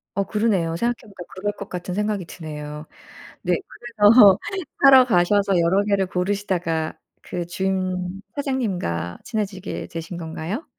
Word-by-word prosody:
어 200 - +1
그러네요. 195 -6 0
생각해 240 +7 0
보니까 195 -4 -11
그럴 205 +2 -2
것 200 - -9
같은 180 0 -5
생각이 210 -1 -1
드네요. 150 -2 -7 0.6
네 - - +1
그래서 215 -3 +5 0.4
사러 265 -2 +9
가셔서 195 -2 +3
여러 180 +4 +3
개를 200 -2 +1
고르시다가 180 -4 -1 0.3
그 175 -1 -5
주인 185 0 -2
사장님과 190 - -2
친해지게 205 -5 -4
되신 165 +1 -6
건가요? 170 - -5
190 Hz, 310 characters per minute, -23 LUFS, 170-210 Hz, 0.6 s, 사러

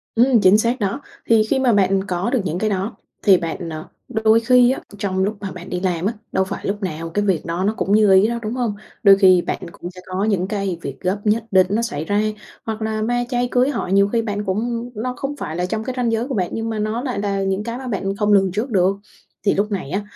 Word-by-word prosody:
Ừm, 240 -1 +4
chính 190 +2 +6
xác 235 +4 0
đó. 205 +6 -2 0.3
Thì 225 -1 +5
khi 265 - +2
mà 250 -4 +3
bạn 195 -1 +2
có 180 +5 -1
được 255 -2 +1
những 175 +1 -2
cái 215 - 0
đó 195 +2 -2 0.3
thì 195 -4 +6
bạn, 170 0 -4
ờ, 155 0 -6 0.2
đôi 220 -1 +3
khi 245 +1 +5
á 265 - -3 0.2
trong 190 -1 -1
lúc 210 +1 -1
mà 195 -2 -4
bạn 180 0 -9
đi 180 - -2
làm 180 -2 -1
á, 215 - +1 0.2
đâu 190 - +2
phải 190 - -6
lúc 205 +2 -2
nào 165 -2 -4
cái 205 +4 -1
việc 185 -6 0
đó 170 +2 -2
nó 210 +3 +1
cũng 195 - -1
như 210 -2 +5
ý 190 +3 +6
đâu, 235 +1 -2
đúng 215 0 -3
hông? 240 -5 -1 0.3
Đôi 195 -1 +8
khi 185 -3 +6
bạn - - -3
cũng 175 +1 -8
sẽ 185 0 -12
có 185 +2 -2
những 195 -4 +1
cái 195 -4 -2
việc 135 -3 -6
gấp 185 +3 -1
nhất 220 +1 +1
định 185 -1 +5
nó 210 +3 +1
xảy 155 -10 -3
ra 205 +4 +1 0.4
hoặc 220 0 -4
là 220 0 -2
ma 245 +2 0
chay, 245 -1 0
cưới 250 +2 +3
hỏi 195 -9 -2
nhiều 200 0 +5
khi 230 +1 +1
bạn 205 -2 -3
cũng 230 +5 -2
nó 250 +4 -3
không 285 +1 -4
phải 155 - -5
là 180 +1 -1
trong 215 +4 -3
cái 255 - -4
ranh 240 -2 +1
giới 225 +2 -1
của 275 - -4
bạn 180 -3 0
nhưng 225 0 -3
mà 220 -1 -3
nó 215 +3 -1
lại 250 -5 -3
là 200 -1 -1
những 195 +1 -1
cái 230 +2 -4
mà 260 0 -7
bạn 195 -3 -2
không 210 0 +2
lường 195 -2 +4
trước 215 +8 -2
được. 195 -2 +2 0.5
Thì 200 - +4
lúc 210 +2 0
này 190 -9 -3
á, 195 - -1
205 Hz, 275 wpm, -20 LUFS, 190-230 Hz, 0.5 s, Đôi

